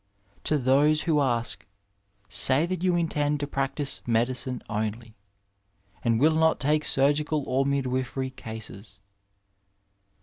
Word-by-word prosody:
To 155 - +2
those 145 +4 +3
who 155 -4 +2
ask, 120 -4 -1 0.6
say 135 +8 +3
that 180 -1 -3
you 180 -1 +2
intend 150 -3 0
to 145 - -2
practise 140 0 -2
medicine 120 +2 0
only, 110 +1 -4 0.9
and 115 -1 +2
wiU 155 +4 +4
not 160 0 +2
take 150 +2 +2
snrgical 145 +2 +2
or 135 +2 0
midwifery 130 -1 -2
cases. 110 -4 -7
135 Hz, 115 wpm, -26 LUFS, 120-150 Hz, 0.9 s, wiU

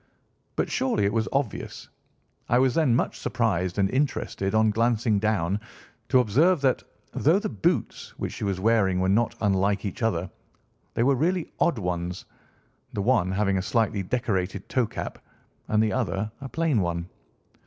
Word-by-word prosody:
"But, - - 0
surely, 255 - +1
it 100 - +1
was 115 -1 0
obvious. 135 -6 -3 0.6
I 120 - +4
was 130 -1 +3
then 150 -8 +3
much - - -1
surprised 95 -6 0
and 100 -1 +3
interested 125 -7 -1
on 110 0 +4
glancing 115 -1 +2
down 100 -3 0 0.5
to 130 - +5
observe 150 - +3
that, 130 -3 +2 0.3
though 160 +6 +3
the 205 - -2
boots 105 - -1
which - - -4
she - - -6
was 100 -2 -1
wearing 100 -3 +2
were 95 0 +1
not 110 +4 +2
unlike 100 0 +1
each 100 +5 -5
other, 95 -6 0 0.6
they 115 - +2
were 140 +3 +4
really 170 +6 0
odd 170 - +2
ones; 90 -2 -3 0.7
the 100 - -2
one 110 -6 +2
having 100 -1 +1
a - - -1
slightly 105 0 0
decorated 95 -3 -2
toe 125 -3 +1
cap, - - -6 0.5
and 110 0 +3
the 110 - 0
other 110 -4 -1
a 135 - -6
plain 155 -8 +1
one. 85 -1 -2
110 Hz, 165 wpm, -26 LUFS, 95-125 Hz, 0.7 s, to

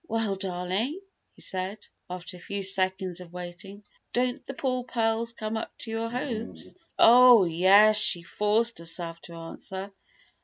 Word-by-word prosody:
"Well, 225 -3 -1
darling," 190 - -2 0.4
he - - -11
said, 190 +3 -5 0.2
after 180 +1 -7
a - - -12
few 200 +2 -5
seconds 190 -1 0
of 175 -2 -12
waiting. 180 +3 -9 0.3
"Don't 250 +2 -1
the 270 - -6
poor 255 -2 -1
pearls 230 -1 -1
come 220 -1 -4
up 220 - -7
to 225 - -4
your 225 +1 -2
hopes?" 235 -2 -5 0.2
"Oh, 245 -2 +8
yes!" 195 +6 +5
she 175 -4 +5
forced 210 +5 0
herself 165 0 -4
to 170 - -11
answer. 190 +4 -7
200 Hz, 150 wpm, -27 LUFS, 180-230 Hz, 0.4 s, Oh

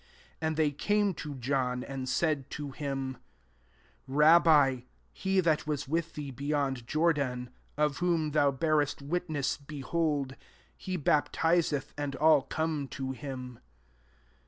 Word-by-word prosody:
26 160 -1 -1
%nd 145 -1 +1
tbtsy - - -24
came 205 -1 +2
to 150 -2 -6
Joto, 125 -1 -1
vmd 130 -2 -2
laid 150 -5 0
to 145 -2 -5
him, 135 -1 -3
*^ - - -18 0.9
Rabbi, 150 -2 +5 0.3
he 190 -1 0
that 160 -3 +1
ras 145 -2 -2
with 165 +3 -2
thee 145 -2 -5
bejond 140 -2 -2
Jor<kin, 140 -6 0 0.3
if 150 -1 +1
whom 170 -4 +1
thou 145 -1 +4
bearest 145 0 0
witness, 155 -3 -1
)ehdld» 145 -1 -2 0.4
he 185 -1 -4
baptiseth, 155 -1 +1
and 145 -2 -2
all 150 -2 +4
:on» 155 -3 -1
to 135 0 -4
him.' 130 -3 -7
145 Hz, 135 wpm, -30 LUFS, 135-160 Hz, 0.9 s, Rabbi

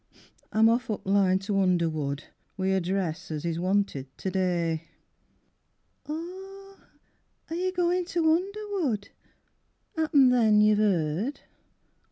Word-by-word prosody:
I'm 220 +1 +5
off 235 +2 +1
up 215 - -3
th' - - -6
line 195 -2 +4
to 200 -1 0
Underwood 160 -6 0 0.3
Wi' 190 0 0
a 190 0 +2
dress 180 0 -2
as 155 0 -4
is 165 -1 -1
wanted 185 -7 0
to 190 - -3
day. 170 -3 -1 1.2
Oh 385 +5 -8 0.7
are - - -2
you 370 +2 -1
goin' 355 0 +1
to 335 -3 +2
Underwood? 370 - -2 0.9
'Appen 300 -5 +4
then 220 -4 +4
you've 210 0 +4
'eered? 195 - +1
205 Hz, 125 wpm, -27 LUFS, -, 1.2 s, I'm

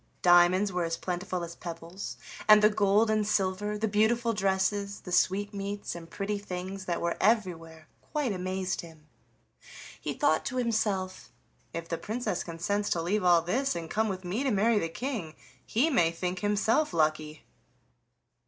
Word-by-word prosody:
Diamonds 180 +3 +5
were 180 -1 0
as 165 0 -2
plentiful 180 0 -3
as 170 0 -7
pebbles, 170 +2 -7 0.3
and 215 0 +8
the 210 - +6
gold 210 +1 +3
and 215 -1 +1
silver, 205 0 0
the 220 +1 0
beautiful 230 +3 +2
dresses, 200 0 0
the 180 - -9
sweetmeats 200 +2 0
and 170 -1 -9
pretty 205 +2 -3
things 190 0 -6
that 175 -2 -1
were 170 0 0
everywhere 165 -7 0 0.2
quite 295 -6 0
amazed 185 0 -2
him; 160 -3 -14 1.0
he - - -3
thought 290 -2 +2
to 255 - -4
himself: 210 -6 -1 0.4
"If 165 0 -5
the 165 -1 -3
Princess 220 -5 -2
consents 190 +5 -2
to 170 - 0
leave 200 +4 0
all 175 -2 +5
this, 260 +11 0
and 165 -1 -5
come 220 0 +1
with 185 -1 -5
me 190 +8 -2
to 275 - +1
marry 215 0 +3
the 165 - -2
King, 210 - -4 0.3
he 275 +9 +1
may 170 - +4
think 180 +2 -3
himself 210 - +1
lucky!" 155 -1 0
190 Hz, 160 wpm, -29 LUFS, 175-210 Hz, 1.0 s, and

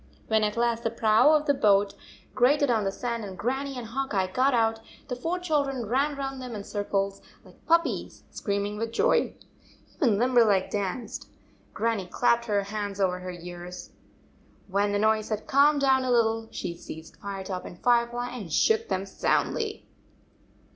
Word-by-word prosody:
When 220 -1 +3
at 210 +1 -1
last 235 -1 +1
the 225 - +1
prow 225 +4 +4
of 305 -1 +3
the 285 - +3
boat 205 -5 +3 0.4
grated 275 +2 +3
on 220 -3 +1
the 195 - 0
sand, 235 +2 -3
and 190 -2 -7
Grannie 270 +3 -2
and 245 - -5
Hawk 265 +1 -3
Eye 190 -1 +2
got 255 +9 +2
out, 225 -2 +2 0.3
the 250 - -2
four 330 +8 -2
children 285 -8 -1
ran 275 +7 +1
round 270 -1 -4
them 250 -3 -6
in 205 - -5
circles 200 -1 -2 0.2
like - - -19
puppies, 335 +1 +1
screaming 200 0 -2
with 225 +1 -3
joy. 460 - +2 0.6
Even 235 - +2
Limberleg 230 -5 +3
danced. 205 +3 -4 0.5
Grannie 225 -5 -1
clapped 235 +4 +2
her 205 -3 +1
hands 205 -1 -4
over 180 -2 +1
her 185 0 -7
ears. 175 0 -8 0.8
When 200 +1 +1
the 205 - +1
noise 215 0 +2
had 215 -1 -3
calmed 285 +1 +4
down 265 -1 +4
a 255 - -2
lit 240 -2 +5
tle, 225 0 -2
she 170 - -5
seized 160 -1 -10
Firetop 195 -2 -5
and 175 - -10
Firefly 240 0 +1
and 200 -9 -7
shook 445 - +3
them 190 +1 -1
soundly. 430 - -1
225 Hz, 175 wpm, -27 LUFS, 200-260 Hz, 0.8 s, lit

